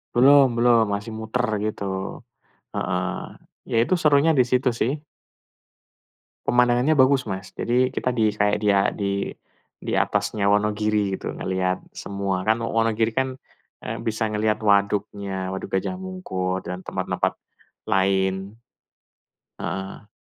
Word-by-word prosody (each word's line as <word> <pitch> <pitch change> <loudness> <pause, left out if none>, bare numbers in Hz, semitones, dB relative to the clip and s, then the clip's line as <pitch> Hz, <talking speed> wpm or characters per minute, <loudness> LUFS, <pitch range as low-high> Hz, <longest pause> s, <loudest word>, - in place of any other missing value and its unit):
Belum 140 +2 +7
belum 120 -1 +5
masih 105 +3 -4
muter 115 +3 -1 0.2
gitu. 105 -1 -3 0.9
Heeh. - - -1 0.7
Ya - - 0
itu 155 - +2
serunya 150 +1 +5
di 125 - +6
situ 130 +1 +3
sih. 125 - +2 1.5
Pemandangannya 125 +5 +3
bagus, 130 -3 +4
Mas. 95 -1 -6
Jadi 125 +2 +1
kita - - -1
di 110 -4 +1
say 105 0 +2
dia 100 -2 +3
di 100 -1 -2 0.5
di - - -5
atasnya 100 -2 +1
Wonogiri 105 -1 +1
gitu - - -4
ngelihat 95 0 -1
semua. 100 -2 -3
Kan 110 +3 +1
Wonogiri 115 0 +1
kan, 130 +1 -1 0.5
eee, - - -3
bisa 110 -1 -1
ngelihat 110 0 0
waduknya, 100 -2 0
Waduk 95 - -5
Gajah 185 - -2
Mungkur 95 - -3
dan 90 +1 -5
tempat - - -4
tempat - - 0 0.5
lain. 95 0 0 1.0
Heeh. 95 +2 -5
105 Hz, 125 wpm, -24 LUFS, 100-120 Hz, 1.5 s, Belum